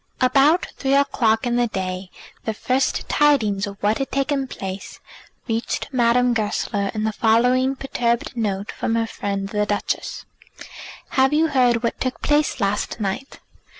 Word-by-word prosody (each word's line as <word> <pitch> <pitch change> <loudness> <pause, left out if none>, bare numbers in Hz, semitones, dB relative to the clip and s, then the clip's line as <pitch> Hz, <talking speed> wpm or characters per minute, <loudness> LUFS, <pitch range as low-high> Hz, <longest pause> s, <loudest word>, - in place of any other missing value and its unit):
About 275 +6 +4
three 270 0 +1
o'clock 235 -5 +2
in 240 0 +1
the 240 0 +2
day 185 -2 -4 0.4
the 220 - -2
first 255 +4 0
tidings 220 -10 +2
of 200 0 -8
what 210 +2 +2
had 270 - -2
taken 275 0 0
place 195 -5 -7 0.5
reached 225 0 -2
Madame 245 -1 +3
Goesler 205 -2 -1
in 215 - -1
the 220 - +1
following 250 +5 +3
perturbed 245 -2 -1
note 205 -3 -2
from 225 - -2
her 230 0 +1
friend 200 -3 -4
the 210 0 0
Duchess: 205 -1 -2 0.8
"Have 265 +1 +3
you 320 +2 +3
heard 245 -4 +3
what 235 - -1
took 255 -1 -2
place 295 -2 +2
last 205 +2 -1
night? 210 +7 -4
235 Hz, 150 wpm, -22 LUFS, 210-265 Hz, 0.8 s, About